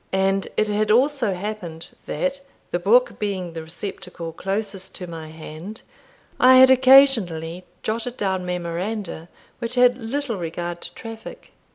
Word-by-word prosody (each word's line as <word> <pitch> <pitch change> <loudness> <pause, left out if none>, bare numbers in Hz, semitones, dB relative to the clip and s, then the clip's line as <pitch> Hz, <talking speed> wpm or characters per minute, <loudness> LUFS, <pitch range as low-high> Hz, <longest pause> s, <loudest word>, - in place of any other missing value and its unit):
And 195 0 +1
it 215 - +3
had 210 +1 0
also 245 -3 +3
happened, 180 -4 -6 0.2
that, 275 0 -1 0.3
the 175 - 0
book 230 +8 +3
being 190 -5 -3
the 165 - -5
receptacle 170 0 -7
nearest 195 -1 -3
to 180 - -6
my 165 -2 -8
hand, 160 +6 -9 0.6
I 255 +1 +8
had 260 0 +8
occasionally 225 - +5 0.2
jotted 235 +3 -3
down 190 -2 -1
memoranda 180 0 -4 0.3
which 235 +1 -3
had 250 0 +4
little 240 0 -3
regard 175 0 -4
to - - -8
traffic. 225 -1 -10
195 Hz, 140 wpm, -23 LUFS, 175-235 Hz, 0.6 s, I